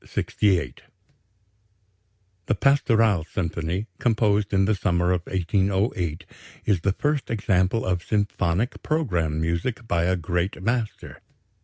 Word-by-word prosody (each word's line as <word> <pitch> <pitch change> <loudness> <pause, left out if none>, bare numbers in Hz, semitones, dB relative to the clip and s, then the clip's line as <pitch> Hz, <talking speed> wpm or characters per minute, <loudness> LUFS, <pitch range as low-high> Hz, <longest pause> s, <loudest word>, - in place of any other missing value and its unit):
68 85 - 0 1.7
The - - +2
"Pastoral" 115 - +3
symphony, 85 +2 -3
composed 110 -5 +2
in 95 -1 +3
the 110 - +2
summer 90 -3 +1
of 90 -1 +1
1808, 95 -1 0 0.4
is 95 -5 +2
the 100 +2 +1
first 145 +4 -1
example 100 -1 +1
of 90 -1 0
symphonic 100 - -1
programme 90 - 0
music 85 +9 -2
by 85 -3 +1
a 95 +1 +2
great 90 +2 -2
master. 115 0 -3
95 Hz, 115 wpm, -24 LUFS, 85-110 Hz, 1.7 s, Pastoral